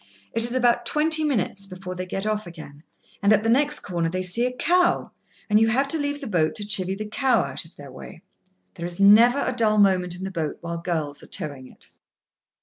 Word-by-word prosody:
It 230 Hz, -, +1 dB
is 240 Hz, +2 st, 0 dB
about 245 Hz, -2 st, +2 dB
twenty 315 Hz, +1 st, +2 dB
minutes 205 Hz, -8 st, -1 dB
before 185 Hz, -1 st, -8 dB
they 185 Hz, 0 st, -6 dB
get 195 Hz, +2 st, -4 dB
off 215 Hz, -2 st, -2 dB
again, 155 Hz, -4 st, -11 dB, 0.4 s
and, 200 Hz, +1 st, +3 dB
at 215 Hz, 0 st, +4 dB
the 225 Hz, -, 0 dB
next 290 Hz, +5 st, +2 dB
corner, 170 Hz, -3 st, -2 dB
they 185 Hz, +2 st, -3 dB
see 230 Hz, +7 st, 0 dB
a -, -, -3 dB
cow, 350 Hz, +8 st, +1 dB, 0.4 s
and 210 Hz, 0 st, +4 dB
you 225 Hz, -, +3 dB
have 265 Hz, +5 st, +1 dB
to 320 Hz, -, +1 dB
leave 285 Hz, 0 st, -3 dB
the -, -, -6 dB
boat 170 Hz, -9 st, 0 dB
to 210 Hz, -, -3 dB
chivy 190 Hz, -3 st, 0 dB
the 215 Hz, -, -5 dB
cow 250 Hz, +2 st, +1 dB
out -, -, -5 dB
of 165 Hz, -, -19 dB
their 140 Hz, -2 st, -12 dB
way. 130 Hz, +5 st, -12 dB, 0.5 s
There 170 Hz, -, -7 dB
is 175 Hz, +1 st, -8 dB
never 220 Hz, +6 st, +6 dB
a 255 Hz, -, -2 dB
dull 220 Hz, -3 st, +2 dB
moment 185 Hz, -3 st, +2 dB
in 180 Hz, -, -8 dB
the 190 Hz, -, -4 dB
boat 165 Hz, -5 st, -3 dB
while 170 Hz, 0 st, -5 dB
girls 155 Hz, -4 st, -3 dB
are -, -, -13 dB
towing 140 Hz, -4 st, -4 dB
it. -, -, -16 dB
200 Hz, 230 wpm, -24 LUFS, 175-240 Hz, 0.5 s, never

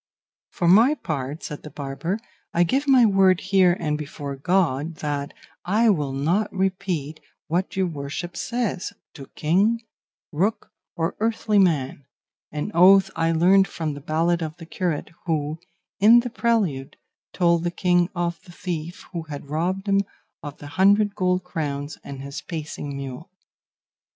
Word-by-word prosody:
"For 175 Hz, -, -1 dB
my 225 Hz, -, +6 dB
part," 145 Hz, -, -4 dB
said 150 Hz, -, -6 dB
the 150 Hz, -, -9 dB
barber, 145 Hz, +7 st, -4 dB, 0.4 s
"I 170 Hz, -, +5 dB
give 270 Hz, -, 0 dB
my 260 Hz, -3 st, +6 dB
word 195 Hz, -3 st, +4 dB
here 185 Hz, -2 st, +3 dB
and 150 Hz, 0 st, -1 dB
before 145 Hz, -2 st, -6 dB
God 160 Hz, 0 st, 0 dB
that 145 Hz, -1 st, -3 dB, 0.3 s
I 215 Hz, +4 st, +3 dB
will 150 Hz, -7 st, -1 dB
not 165 Hz, +10 st, 0 dB
repeat 185 Hz, -6 st, -2 dB, 0.3 s
what 180 Hz, +4 st, -1 dB
your 190 Hz, 0 st, +2 dB
worship 165 Hz, +2 st, -5 dB
says, 235 Hz, -3 st, -2 dB, 0.2 s
to 135 Hz, -2 st, -10 dB
King, 200 Hz, +9 st, +2 dB, 0.5 s
Rook 190 Hz, +8 st, -1 dB, 0.2 s
or 165 Hz, 0 st, -1 dB
earthly 220 Hz, -1 st, +1 dB
man 145 Hz, -7 st, +1 dB, 0.4 s
an 150 Hz, +7 st, -3 dB
oath 190 Hz, +2 st, +6 dB
I 165 Hz, 0 st, +1 dB
learned 185 Hz, +4 st, +5 dB
from 155 Hz, -3 st, -4 dB
the 145 Hz, -, -8 dB
ballad 165 Hz, +3 st, +1 dB
of 155 Hz, 0 st, -4 dB
the 165 Hz, -, -10 dB
curate, 170 Hz, -2 st, -3 dB, 0.2 s
who, 155 Hz, -1 st, -1 dB, 0.4 s
in 225 Hz, +4 st, +7 dB
the 245 Hz, 0 st, -5 dB
prelude, 210 Hz, -, 0 dB, 0.3 s
told 170 Hz, -2 st, +2 dB
the 175 Hz, -, +1 dB
king 175 Hz, 0 st, +2 dB
of 170 Hz, -1 st, -2 dB
the 185 Hz, -, -15 dB
thief 175 Hz, -1 st, -5 dB
who 170 Hz, -, -3 dB
had 145 Hz, -1 st, -8 dB
robbed 185 Hz, +6 st, -1 dB
him 200 Hz, 0 st, +3 dB, 0.4 s
of 145 Hz, -2 st, -8 dB
the -, -, -11 dB, 0.2 s
hundred 205 Hz, +1 st, +5 dB
gold 185 Hz, -2 st, 0 dB
crowns 145 Hz, -4 st, -4 dB
and 135 Hz, -1 st, -8 dB
his 140 Hz, 0 st, -6 dB
pacing 150 Hz, -3 st, -6 dB
mule." 135 Hz, +5 st, -7 dB
170 Hz, 155 wpm, -24 LUFS, 150-195 Hz, 0.5 s, in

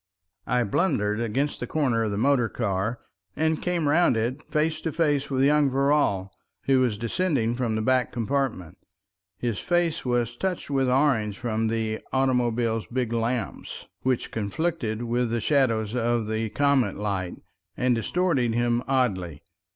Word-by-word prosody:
I 125 Hz, 0 st, +2 dB
blundered 105 Hz, -, 0 dB
against 130 Hz, +6 st, -1 dB
the -, -, -4 dB
corner 130 Hz, -7 st, +1 dB
of 110 Hz, -, -1 dB
the 100 Hz, -, -3 dB
motor 125 Hz, 0 st, +2 dB
car, 105 Hz, +1 st, -2 dB, 0.4 s
and 160 Hz, 0 st, 0 dB
came 175 Hz, -4 st, 0 dB
round 150 Hz, -5 st, +4 dB
it 120 Hz, +6 st, -1 dB
face 155 Hz, +1 st, 0 dB
to 160 Hz, -, -2 dB
face 145 Hz, -3 st, +1 dB
with 135 Hz, -1 st, +1 dB
young 145 Hz, 0 st, +4 dB
Verrall, 135 Hz, -8 st, +1 dB, 0.3 s
who 135 Hz, -1 st, +3 dB
was 120 Hz, -5 st, +1 dB
descending 120 Hz, -, 0 dB
from 120 Hz, -3 st, -1 dB
the 110 Hz, -, -1 dB
back 130 Hz, 0 st, +2 dB
compartment. 115 Hz, -, -2 dB, 0.6 s
His 115 Hz, -1 st, -2 dB
face 175 Hz, -2 st, 0 dB
was 120 Hz, -2 st, 0 dB
touched 180 Hz, 0 st, -3 dB
with 135 Hz, -2 st, +2 dB
orange 125 Hz, -7 st, +2 dB
from 115 Hz, -2 st, -1 dB
the 110 Hz, -1 st, -1 dB
automobile's 120 Hz, -4 st, +1 dB
big 120 Hz, -2 st, -2 dB
lamps, 115 Hz, -2 st, -3 dB, 0.2 s
which 130 Hz, -2 st, -1 dB
conflicted 115 Hz, +1 st, -2 dB
with 120 Hz, 0 st, 0 dB
the 115 Hz, +1 st, 0 dB
shadows 115 Hz, -4 st, +1 dB
of 120 Hz, -1 st, +1 dB
the 110 Hz, +1 st, -2 dB
comet 140 Hz, -5 st, +2 dB
light, 100 Hz, -3 st, -2 dB, 0.4 s
and 125 Hz, 0 st, +2 dB
distorted 125 Hz, -, 0 dB
him 120 Hz, 0 st, +1 dB
oddly. 95 Hz, -, 0 dB
120 Hz, 150 wpm, -25 LUFS, 110-140 Hz, 0.6 s, round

